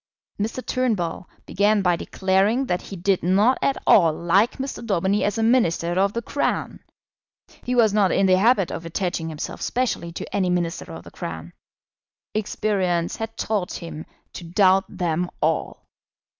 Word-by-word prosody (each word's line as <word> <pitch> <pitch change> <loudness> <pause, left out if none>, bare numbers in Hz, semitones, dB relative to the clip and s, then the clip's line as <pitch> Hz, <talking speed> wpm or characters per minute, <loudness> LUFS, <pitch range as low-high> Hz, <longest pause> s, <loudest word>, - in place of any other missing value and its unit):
Mr. 225 +4 -3
Turnbull 205 -9 -1 0.2
began 205 +1 +2
by 180 -2 +3
declaring 195 +9 +1
that 180 -7 -1
he 195 - -9
did 190 +1 +1
not 205 +8 +3
at 275 - +1
all 170 -5 +6
like 175 +8 +2
Mr. 270 -2 -5
Daubeny 200 -1 +1
as 205 +1 0
a 225 - 0
Minister 175 -8 +2
of 200 +1 +2
the 235 - -3
Crown. 285 - -2 0.8
He 250 - -2
was 225 -4 +4
not 205 -3 +3
in 195 - +2
the 185 -1 +4
habit 205 -3 +3
of - - -5
attaching 165 -1 -3
himself 155 -2 -6
specially 240 -9 -1
to - - -6
any 185 -2 +1
Minister 175 -1 -2
of 80 +1 -9
the - - -13
Crown. 80 +1 -7 0.8
Experience 190 -5 -1
had 225 0 -6
taught 205 -5 -2
him 160 -2 -7 0.3
to - - -8
doubt 185 +2 +3
them 175 -1 -2
all. - - -1
190 Hz, 160 wpm, -23 LUFS, 175-215 Hz, 0.8 s, all